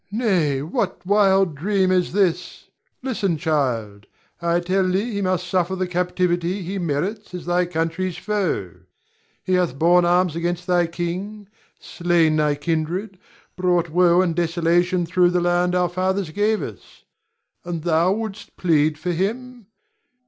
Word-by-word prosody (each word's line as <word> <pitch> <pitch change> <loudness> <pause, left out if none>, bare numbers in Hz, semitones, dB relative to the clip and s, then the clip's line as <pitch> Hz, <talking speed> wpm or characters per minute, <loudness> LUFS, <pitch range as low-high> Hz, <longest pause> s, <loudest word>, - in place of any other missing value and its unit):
Nay, 180 - 0
what 180 +3 -3
wild 195 -3 +3
dream 190 +5 +1
is 180 -1 +1
this? 190 -3 -1 0.3
Listen, 210 -10 -1
child! 120 -10 -2 0.3
I 170 0 +1
tell 185 +1 0
thee 200 +6 0
he 200 - -2
must 185 -1 0
suffer 185 +1 0
the 185 0 -1
captivity 180 +1 -1
he 190 +3 -4
merits 180 +6 -3
as 180 - -7
thy 175 0 +1
country's 165 +2 -2
foe. 185 - -2 0.7
He 185 - -1
hath 180 -7 +1
borne 175 +3 +4
arms 175 -1 +2
against 175 +1 -2
thy 175 -2 +2
king, 185 +5 -5 0.3
slain 170 -3 +1
thy 150 -1 +2
kindred, 170 +6 -3 0.4
brought 175 -2 +1
woe 175 +1 +4
and 170 -3 -1
desolation 175 +1 +1
thro' 180 +1 +3
the 180 0 +1
land 175 +1 +1
our 180 -1 +2
fathers 185 0 -1
gave 210 +3 0
us. - - -11 0.6
And 170 -3 -5
thou 170 +1 +2
wouldst 215 0 -5
plead 155 -3 +2
for 180 +3 -3
him! 230 +5 -3
180 Hz, 145 wpm, -22 LUFS, 170-190 Hz, 0.7 s, borne